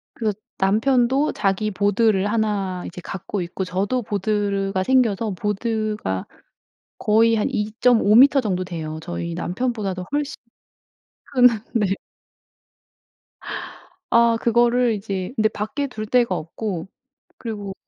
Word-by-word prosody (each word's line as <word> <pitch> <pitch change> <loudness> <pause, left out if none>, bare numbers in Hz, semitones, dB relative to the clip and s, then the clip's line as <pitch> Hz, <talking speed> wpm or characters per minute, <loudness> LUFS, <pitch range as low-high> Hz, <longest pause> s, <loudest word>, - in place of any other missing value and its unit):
그래서 220 -3 -1 0.2
남편도 245 +7 +2
자기 200 +1 0
보드를 205 0 +2
1 200 -5 -1
이제 180 - -8
갖고 195 +1 -4
있고 175 +2 -4
저도 195 +7 -1
보드가 200 -2 -1
생겨서 230 -3 +2
보드가 210 - -2 0.7
거의 225 +2 +3
한 215 - +1
2.5 215 0 +2
미터 275 +3 +7
정도 185 -5 -1
돼요. 160 -4 -5
저희 85 - -4
남편보다도 195 - -2
훨씬 290 0 -1 1.0
큰 250 -2 +7 0.3
네. 220 -4 +2 2.2
아 235 -1 +4
그거를 240 +1 +3
이제 195 0 -4
근데 215 -3 +3
밖에 220 +7 -3
둘 215 -5 -6
데가 235 -3 +2
없고 175 +2 -4 0.5
그리고 205 -4 -5
210 Hz, 220 characters per minute, -22 LUFS, 190-235 Hz, 2.2 s, 미터